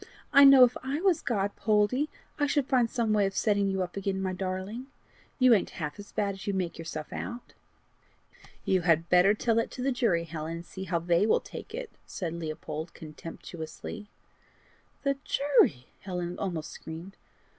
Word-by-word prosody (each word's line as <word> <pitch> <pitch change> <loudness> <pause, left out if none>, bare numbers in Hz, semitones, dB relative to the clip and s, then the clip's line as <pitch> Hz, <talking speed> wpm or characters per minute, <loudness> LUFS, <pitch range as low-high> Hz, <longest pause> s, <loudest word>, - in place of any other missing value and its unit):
I 280 0 +9
know 275 -2 +10
if 245 -1 +4
I 270 +3 -2
was 370 -2 +2
God, 205 -5 -1
Poldie, 220 +7 +2 0.3
I 290 - +3
should 285 -1 +1
find 250 -3 +2
some 230 -3 0
way 205 -2 +3
of 195 - -6
setting 205 -2 +2
you 190 -1 0
up 180 - -7
again, 195 -1 -2
my 190 -1 -1
darling. 190 +7 -4 0.5
You 255 -2 +6
ain't 200 - +2
half 150 +1 -4
as 205 - -10
bad 200 -1 0
as 195 +1 -10
you 200 - 0
make 180 -3 -2
yourself 155 -2 -6
out." 240 0 -6 1.1
"You 185 -1 +2
had 165 -1 +2
better 180 +3 +5
tell 230 +2 +1
that 230 - +1
to 250 - -5
the 270 - +2
jury, 220 -10 +1
Helen, 160 -1 -5
and 170 +1 -7
see 190 +1 -7
how 175 -2 0
they 170 +4 +2
will - - +4
take - - -9
it," - - -6 0.2
said 170 -4 -4
Leopold 160 0 -5
contemptuously. 165 +5 -8 0.9
"The 275 -1 +1
jury!" 265 - +3
Helen 180 -2 -4
almost 170 -5 -3
screamed. 165 +5 -9
195 Hz, 180 wpm, -29 LUFS, 170-240 Hz, 1.1 s, know